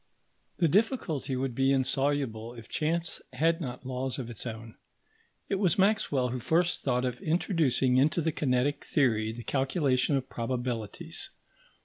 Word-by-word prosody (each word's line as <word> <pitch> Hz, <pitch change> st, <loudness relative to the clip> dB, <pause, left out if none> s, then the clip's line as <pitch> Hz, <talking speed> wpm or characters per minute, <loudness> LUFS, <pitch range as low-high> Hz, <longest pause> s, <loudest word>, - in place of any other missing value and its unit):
The 170 Hz, -, +3 dB
difficulty 180 Hz, -, +1 dB
would 130 Hz, -1 st, -1 dB
be 135 Hz, +2 st, +2 dB
insoluble 130 Hz, -3 st, 0 dB
if 115 Hz, -2 st, -11 dB
chance 165 Hz, +2 st, -1 dB
had 165 Hz, +6 st, +2 dB
not 130 Hz, -3 st, -5 dB
laws 130 Hz, 0 st, -3 dB
of 120 Hz, -3 st, -5 dB
its 120 Hz, -, -6 dB
own. 110 Hz, 0 st, -7 dB, 0.7 s
It 195 Hz, -, -1 dB
was 185 Hz, -5 st, +2 dB
Maxwell 190 Hz, -11 st, +2 dB
who 125 Hz, +1 st, -3 dB
first 170 Hz, +7 st, +1 dB
thought 125 Hz, -1 st, +1 dB
of 125 Hz, -1 st, -3 dB
introducing 155 Hz, -6 st, +2 dB
into 150 Hz, +6 st, +3 dB
the 160 Hz, 0 st, +1 dB
kinetic 135 Hz, -1 st, 0 dB
theory 110 Hz, -6 st, +2 dB
the 115 Hz, +1 st, -8 dB
calculation 135 Hz, 0 st, +1 dB
of 135 Hz, -1 st, -1 dB
probabilities. 120 Hz, -2 st, -4 dB
135 Hz, 145 wpm, -29 LUFS, 125-160 Hz, 0.7 s, The